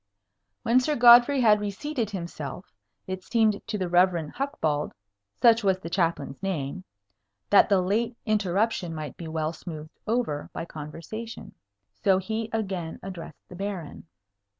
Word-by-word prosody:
When 245 +1 +4
Sir 295 +4 0
Godfrey 240 +3 +7
had 215 -3 +5
reseated 220 +4 -3
himself, 170 -3 -6 0.3
it 185 0 -5
seemed 220 -2 +2
to 220 -2 -2
the 185 -2 -1
Rev. 175 -3 +3
Hucbald 160 - -1 0.5
(such 230 -1 +5
was 190 -2 +3
the 170 -3 -8
Chaplain's 165 -7 -1
name) 185 -2 -3 0.7
that - - +7
the 195 -2 +4
late 225 +5 0
interruption 205 -4 0
might 150 -4 -6
be 165 - -8
well 160 0 -2
smoothed 155 -1 -9
over 220 -11 -1
by - - -4
conversation. 165 +10 -8 0.5
So 190 -2 +5
he 220 +4 -3
again 190 -7 -3
addressed 175 -5 -9
the 180 - -11
Baron. 190 -4 -5
190 Hz, 140 wpm, -26 LUFS, 165-225 Hz, 0.7 s, Godfrey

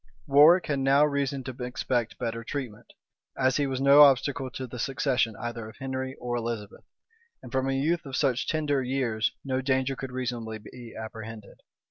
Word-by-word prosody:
Warwick 150 +6 +6
had 140 -2 -1
now 135 +2 +4
reason 140 -2 -1
to 130 -1 -6
expect 125 -1 -2
better 115 -1 -3
treatment, 120 -3 -6 0.4
as 130 0 +2
he 145 -1 +1
was 130 -1 -2
no 140 +2 +7
obstacle 135 -1 +4
to 130 +1 -6
the 125 0 -8
succession 125 -3 0
either 120 -2 -5
of - - -15
Henry 130 0 -4
or 120 -1 -4
Elizabeth; 115 -3 -5 0.6
and - - -10
from 130 0 0
a - - 0
youth 155 +4 0
of 135 - -5
such 130 -4 +1
tender 150 -4 0
years 125 -4 0
no 130 -1 -1
danger 130 0 0
could 130 0 -6
reasonably 120 -3 -4
be 115 +2 -12
apprehended. 110 -1 -9
130 Hz, 175 wpm, -27 LUFS, 120-135 Hz, 0.6 s, no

